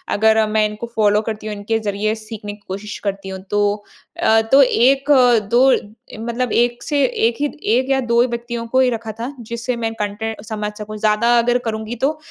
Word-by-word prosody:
अगर 220 +1 +4
मैं 215 0 +2
इनको 210 +2 -5
फॉलो 210 -1 +3
करती 215 -1 -5
हूँ 210 - -4
इनके 205 +2 -1
ज़रिए 210 0 -1
सीखने 215 -1 -8
की 205 - -16
कोशिश 200 +2 -6
करती 195 -1 -3
हूँ 190 0 -6
तो। 205 0 +2 0.6
अ, 220 0 +4
तो 275 +1 +8
1 270 +3 +3
अ, 245 -4 +6
2 240 +6 +3 0.5
मतलब 240 0 -2
1 240 0 +1
से 290 -2 +1
1 230 -2 +1
ही 290 - +1 0.3
1 260 +2 0
या 270 -1 +3
2 235 0 +5
व्यक्तियों 235 -1 -4
को 260 +3 +1
ही 260 -1 +4
रखा 225 -2 -4
था, 245 +5 -4
जिससे 235 +2 -4
मैं 225 -1 -3
कंटेंट 210 +1 -3
समझ 210 -2 -4
सकूँ। 215 0 -7
ज़्यादा 220 +3 +3
अगर 240 +1 +2
करूँगी 220 +1 -3
तो 300 +3 +1
225 Hz, 200 wpm, -19 LUFS, 210-240 Hz, 0.6 s, तो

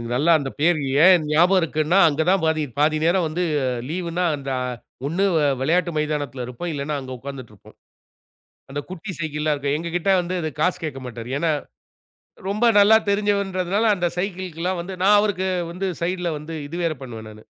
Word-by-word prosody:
நல்ல 145 +6 +1
அந்த 135 -1 -4
பேரு 160 -1 +3 0.2
ஏன் 180 -3 +6
ஞாபகம் 175 +5 +4
இருக்குன்னா, 160 +3 +1
அங்கதான் 160 +5 +2
பாதி 160 -1 +1 0.2
பாதி 155 +1 +3
நேரம் 175 +1 +3
வந்து 170 +4 -2 0.5
லீவ்னா 175 +1 -2
அந்த 135 -1 -5 0.6
ஒண்ணு 180 +6 +1 0.2
அ - - +4
விளையாட்டு 170 +5 +1
மைதானத்தில 145 -5 -2
இருப்போம். 145 +8 -5
இல்லன்னா, 145 +1 -3
அங்க 130 -1 -8
உட்கார்ந்துட்டு 130 -4 -9
இருப்போம். 100 - -19 0.9
அந்த 145 +1 -3
குட்டி 185 +2 -7
சைக்கிள்லாம் 155 -1 -1
இருக்கும். 140 0 -1
எங்ககிட்ட 170 +3 -1
வந்து 180 +1 -3 0.2
காசு 180 +2 +1
கேட்க 135 -4 -4
மாட்டாரு. 120 -1 -7
ஏன்னா, 165 0 +1 1.0
ரொம்ப 215 +4 +1
நல்லா 205 +2 +7
தெரிஞ்சவர்ன்றதுனால 200 0 0
அந்த 175 -2 0
சைக்கிள்கிலாம் 180 -2 -3
வந்து, 185 +2 -7
நான் 205 +2 +6
அவருக்கு 190 -3 0 0.2
வந்து 190 +2 -3 0.2
சைட்ல 180 0 -1
வந்து 160 +2 -7
இது 165 - -6
வேற 165 -2 0
பண்ணுவேன், 110 -4 -8
நானு. 110 0 -14
170 Hz, 160 wpm, -22 LUFS, 145-185 Hz, 1.0 s, நல்லா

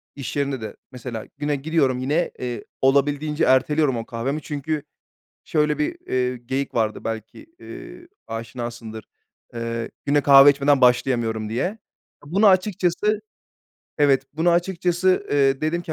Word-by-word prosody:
İş 140 -3 -6
yerinde 140 -4 -1
de 110 - -7 0.2
mesela 125 -3 -7
güne 145 0 -1
gidiyorum 140 -3 0
yine, 150 +7 0
eee, 120 -1 -4 0.2
olabildiğince 145 +3 +2
erteliyorum 135 +1 +3
o 115 - -5
kahvemi. 130 +6 -3
Çünkü 150 0 -3 0.6
şöyle 150 -1 +1
bir, 150 - -1
eee, 125 0 0
geyik 130 +3 -4
vardı 110 -2 -1
belki, 110 - -6
eee, 345 - -11 0.2
aşinasındır. 115 -1 -6 0.5
Eee, 115 0 -4 0.2
"Güne 145 +1 +3
kahve 140 0 +8
içmeden 140 -1 +3
başlayamıyorum." 120 -3 +2
diye. 180 - -2 0.5
Bunu 195 +8 +3
açıkçası 190 +1 +2 0.8
Evet, 140 -3 +4
bunu 165 +3 +2
açıkçası, 180 +1 +1
eee, 135 -1 +2
dedim 165 +3 -1
ki, 165 - -5
140 Hz, 130 wpm, -22 LUFS, 125-155 Hz, 0.8 s, kahve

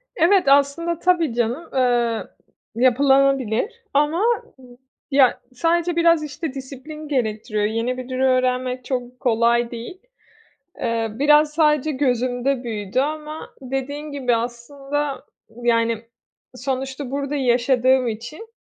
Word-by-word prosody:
Evet, 360 +3 +4
aslında 285 +5 +3
tabii 345 -8 +2
canım, 240 +7 -1
ııı, 240 -3 +1 0.5
yapılanabilir 270 - +2
ama 300 +5 +2 0.9
ya, 270 -2 +4
sadece 335 +5 +1
biraz, 335 -2 +4
işte, 300 0 -5
disiplin 275 +3 -8
gerektiriyor. 220 -5 -1
Yeni 230 +4 -1
bir 255 0 -7
dil 255 0 -3
öğrenmek 255 -1 +1
çok 250 -1 -4
kolay 235 0 +2
değil. 240 +9 -7 0.8
Eee, 230 -1 -1
biraz 295 +4 +4
sadece 300 -2 +3
gözümde 255 -1 0
büyüdü 210 0 -2
ama 305 +2 -4
dediğin 270 +3 -4
gibi 255 -4 0
aslında, 275 +5 -4 0.4
yani, 230 -1 +2 0.5
sonuçta 265 +1 -4
burada 280 +1 -3
yaşadığım 255 0 +2
için, 235 - -7
260 Hz, 110 wpm, -22 LUFS, 240-295 Hz, 0.9 s, Evet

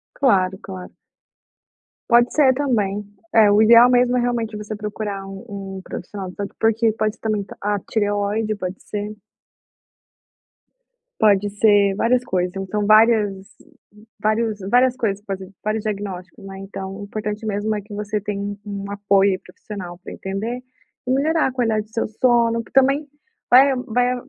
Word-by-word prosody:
Claro, 190 -8 +2
claro. 185 -2 -9 1.2
Pode 240 0 +5
ser 270 -4 +5
também. 210 -7 -1 0.3
É, 220 -2 +6
o 210 +1 +5
ideal 235 +2 +8
mesmo 250 0 +3
é - - +2
realmente 230 -3 -2
você 210 +1 -6
procurar 210 -2 -5
um 195 0 -8
um - - -7
profissional 185 +1 -7
de - - -12
saúde, 200 -1 -5
por 225 - +4
porque 225 0 +1
pode 215 0 -1
ser - - -36
também 215 -3 -1 0.2
a 205 0 0
tireoide, 205 +1 -1
pode 185 -2 -6
ser. 210 0 -5 2.0
Pode 205 -2 +4
ser, 205 -1 +4
várias 245 +4 +2
coisas, 180 -4 -1
então, 195 +2 -2
várias 215 -3 +4 0.7
vários 215 0 0
várias 250 +2 +4
coisas 205 -5 -2
po 200 - -4 0.3
vários 215 0 -1
diagnósticos, 195 -4 -5
né. 195 0 -8
Então, 195 0 -7
o 205 - -7
importante 210 +1 -5
mesmo 215 +1 -1
é 210 - -3
que 210 +1 -12
você 210 +1 -2
tem 205 0 -4
um 200 -1 -6
apoio 200 -1 +2
profissional 180 -2 -9
pra - - -8
entender, 210 +6 -4 0.5
e - - +1
melhorar 310 +5 +2
a - - -3
qualidade 225 -4 0
do 215 - -28
seu 230 - -1
sono, 230 0 +2
porque - - -20
também, 275 +3 +1 0.4
vai 265 +2 +6
vai 245 +2 +1
210 Hz, 160 wpm, -21 LUFS, 200-230 Hz, 2.0 s, ideal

